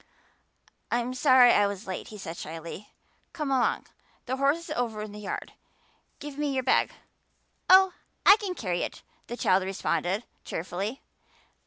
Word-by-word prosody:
"I'm 240 Hz, +1 st, -1 dB
sorry 255 Hz, -2 st, +6 dB
I 205 Hz, -, +4 dB
was 200 Hz, +1 st, -6 dB
late," 185 Hz, -1 st, -5 dB
he 215 Hz, -, -10 dB
said 170 Hz, -4 st, -7 dB
shyly. 165 Hz, +5 st, -8 dB, 0.4 s
"Come 300 Hz, -4 st, -3 dB
along. 260 Hz, -2 st, +1 dB, 0.4 s
The 260 Hz, +1 st, -2 dB
horse 275 Hz, +3 st, +3 dB
is 335 Hz, 0 st, -11 dB
over 230 Hz, -6 st, -2 dB
in 210 Hz, -, -7 dB
the 210 Hz, -, -9 dB
yard. 205 Hz, -, -5 dB, 0.7 s
Give 290 Hz, -1 st, -8 dB
me 290 Hz, -2 st, -1 dB
your 260 Hz, -, 0 dB
bag." 255 Hz, -, +3 dB, 0.8 s
"Oh, 375 Hz, 0 st, +7 dB, 0.3 s
I 395 Hz, -, +10 dB
can 400 Hz, -5 st, -4 dB
carry 180 Hz, -, -2 dB
it," -, -, -5 dB, 0.2 s
the 240 Hz, -, -6 dB
child 185 Hz, -4 st, +3 dB
responded 190 Hz, +1 st, -1 dB, 0.2 s
cheerfully. 195 Hz, +9 st, -4 dB
240 Hz, 155 wpm, -27 LUFS, 195-275 Hz, 0.8 s, I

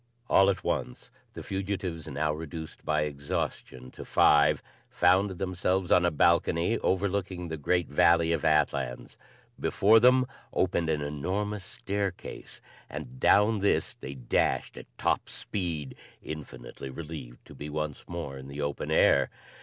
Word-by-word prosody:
All 95 Hz, 0 st, +6 dB
at 95 Hz, -, -1 dB
once -, -, -3 dB, 0.2 s
the -, -, -7 dB
fugitives, 95 Hz, -4 st, -4 dB
now 75 Hz, +1 st, -1 dB
reduced 80 Hz, 0 st, -7 dB
by 75 Hz, 0 st, +1 dB
exhaustion 70 Hz, -3 st, -4 dB
to -, -, -9 dB
five, 75 Hz, 0 st, +4 dB, 0.3 s
found 95 Hz, +3 st, +3 dB
themselves 95 Hz, 0 st, -1 dB
on 90 Hz, -, +5 dB
a -, -, +4 dB
balcony 85 Hz, +5 st, +2 dB
overlooking 95 Hz, -2 st, -1 dB
the 80 Hz, -, -4 dB
great 90 Hz, +3 st, +1 dB
valley 85 Hz, +2 st, +4 dB
of 85 Hz, -, 0 dB
Atlans. 70 Hz, -5 st, 0 dB, 0.4 s
Before 110 Hz, +3 st, +4 dB
them 125 Hz, +2 st, +5 dB, 0.3 s
opened 85 Hz, -3 st, +1 dB
an 75 Hz, -2 st, 0 dB
enormous 95 Hz, +8 st, -3 dB
staircase 100 Hz, -2 st, -5 dB, 0.3 s
and 65 Hz, -4 st, -8 dB
down 105 Hz, +7 st, +4 dB
this 100 Hz, -, +1 dB
they 70 Hz, -, -8 dB
dashed 60 Hz, -2 st, 0 dB
at -, -, -10 dB
top -, -, 0 dB
speed, 85 Hz, -8 st, -3 dB, 0.3 s
infinitely 70 Hz, -3 st, -8 dB
relieved 75 Hz, -4 st, -8 dB
to -, -, -13 dB
be 75 Hz, -, -7 dB
once 75 Hz, -1 st, -4 dB
more 80 Hz, -6 st, -5 dB
in 65 Hz, -, -10 dB
the 70 Hz, +1 st, -8 dB
open 70 Hz, -1 st, -3 dB
air. 70 Hz, -2 st, +4 dB
80 Hz, 140 wpm, -28 LUFS, 75-95 Hz, 0.4 s, All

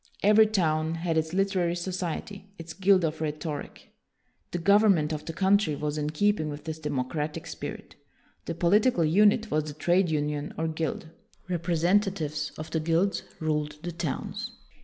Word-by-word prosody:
Every 215 Hz, +2 st, +6 dB
town 160 Hz, -6 st, +1 dB
had 165 Hz, 0 st, -1 dB
its 160 Hz, 0 st, 0 dB
literary 185 Hz, -2 st, +1 dB
society, 185 Hz, +2 st, -4 dB
its 165 Hz, -1 st, -8 dB
guild 190 Hz, -2 st, +4 dB
of 155 Hz, 0 st, -3 dB
rhetoric. 150 Hz, -1 st, -5 dB, 0.6 s
The 175 Hz, -, -3 dB
government 195 Hz, -4 st, +4 dB
of 150 Hz, 0 st, -5 dB
the -, -, -4 dB
country 190 Hz, -2 st, +2 dB
was 150 Hz, +1 st, -3 dB
in 150 Hz, -1 st, -1 dB
keeping 160 Hz, 0 st, +1 dB
with 145 Hz, 0 st, -7 dB
this 160 Hz, -1 st, -5 dB
democratic 150 Hz, +1 st, -3 dB
spirit. -, -, -7 dB, 0.5 s
The 170 Hz, -, -4 dB
political 180 Hz, +2 st, +3 dB
unit 210 Hz, +6 st, +4 dB
was 155 Hz, 0 st, +1 dB
the 150 Hz, -2 st, -7 dB
trade 175 Hz, +4 st, +2 dB
union 150 Hz, -1 st, -2 dB
or 160 Hz, -, 0 dB
guild. 160 Hz, 0 st, -3 dB, 0.4 s
Representatives 170 Hz, -2 st, 0 dB
of 155 Hz, 0 st, -7 dB
the 160 Hz, -, 0 dB
guilds 165 Hz, +5 st, +1 dB, 0.2 s
ruled 150 Hz, -1 st, -1 dB
the 175 Hz, -, -3 dB
towns. 165 Hz, -5 st, -4 dB
165 Hz, 155 wpm, -27 LUFS, 155-190 Hz, 0.6 s, Every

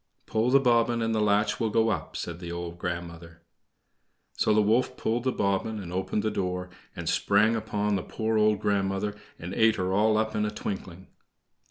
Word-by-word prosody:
"Pull 110 Hz, +2 st, +1 dB
the 135 Hz, +2 st, +6 dB
bobbin 120 Hz, -2 st, +3 dB
and 115 Hz, 0 st, 0 dB
the 110 Hz, -, +1 dB
latch 105 Hz, 0 st, +2 dB
will 115 Hz, -, +1 dB
go 115 Hz, +1 st, +2 dB
up," 105 Hz, -, -3 dB
said 85 Hz, -1 st, -5 dB
the 85 Hz, -1 st, -6 dB
old 85 Hz, 0 st, -6 dB
grandmother. 85 Hz, -1 st, -6 dB, 0.9 s
So -, -, +1 dB
the 105 Hz, -, +4 dB
wolf 120 Hz, +4 st, +1 dB
pulled 115 Hz, +2 st, -1 dB
the 130 Hz, -, +2 dB
bobbin 100 Hz, +1 st, -1 dB
and 90 Hz, -3 st, -7 dB
opened 95 Hz, +3 st, -1 dB
the 110 Hz, -, 0 dB
door, 90 Hz, -1 st, -3 dB, 0.2 s
and -, -, -6 dB
sprang 110 Hz, +3 st, +3 dB
upon 105 Hz, -2 st, -1 dB
the -, -, -2 dB
poor 110 Hz, +2 st, -1 dB
old 105 Hz, -1 st, +3 dB
grandmother 100 Hz, 0 st, 0 dB, 0.2 s
and 85 Hz, +3 st, -7 dB
ate 110 Hz, +1 st, +4 dB
her 95 Hz, 0 st, -1 dB
all 105 Hz, +2 st, +3 dB
up 110 Hz, 0 st, 0 dB
in 105 Hz, -, +1 dB
a 105 Hz, -, 0 dB
twinkling. 95 Hz, -3 st, -6 dB
105 Hz, 195 wpm, -27 LUFS, 95-110 Hz, 0.9 s, the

